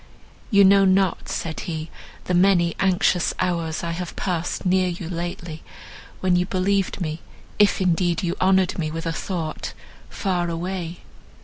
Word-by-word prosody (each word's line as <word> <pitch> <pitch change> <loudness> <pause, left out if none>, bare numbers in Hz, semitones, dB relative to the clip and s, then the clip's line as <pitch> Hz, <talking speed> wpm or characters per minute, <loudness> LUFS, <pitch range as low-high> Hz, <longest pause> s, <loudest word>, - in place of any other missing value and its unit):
"You 200 -3 +6
know 195 +1 +6
not," 190 -1 +2
said 160 -1 -3
he, 160 -1 -4 0.3
"the 180 - -2
many 175 -2 +4
anxious 185 -2 +2
hours 170 -3 -1
I 170 - -2
have 175 +1 -5
passed 175 0 -2
near 185 0 +3
you 175 -1 -4
lately, 170 -2 -5 0.6
when 185 -1 +3
you 180 0 +1
believed 195 +1 0
me, 160 -3 -3 0.4
if 205 -1 +4
indeed 175 -1 +1
you 175 -1 -1
honoured 185 -1 +3
me 155 -2 -1
with 165 +2 -5
a 165 - -1
thought, 165 -2 -4 0.4
far 180 -3 -1
away. 175 0 -4
180 Hz, 150 wpm, -23 LUFS, 170-190 Hz, 0.6 s, You